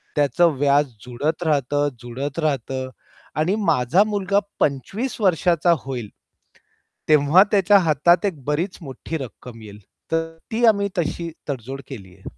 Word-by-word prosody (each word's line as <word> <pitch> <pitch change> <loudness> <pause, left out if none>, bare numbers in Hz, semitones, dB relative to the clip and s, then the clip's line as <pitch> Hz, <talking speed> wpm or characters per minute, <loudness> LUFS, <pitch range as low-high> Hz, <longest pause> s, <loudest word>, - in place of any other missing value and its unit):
त्याचं 150 +2 +3
व्याज 145 +1 +4 0.2
जुळत 140 +8 -2
राहतं, 145 -2 +1
जुळत 135 +6 -5
राहतं 130 -3 -2 0.5
आणि 180 +6 +2
माझा 155 - +3
मुलगा 200 -2 0 0.2
25 190 - -1
वर्षाचा 175 -2 +3
होईल 125 -5 -6 1.0
तेव्हा 150 +4 +6
त्याच्या 200 0 +5
हातात 170 +3 +3
एक 165 -9 -3
बरीच 165 +6 -1
मोठी 140 +2 -6
रक्कम 125 -3 -9
येईल. 105 -1 -11 0.3
तर 165 0 -1 0.2
ती 225 +2 -1
आम्ही 200 -3 +4
तशी 170 0 -2 0.2
तडजोड 135 +1 -5
केली 95 -9 -10
आहे. 95 - -22
150 Hz, 130 wpm, -22 LUFS, 135-175 Hz, 1.0 s, तेव्हा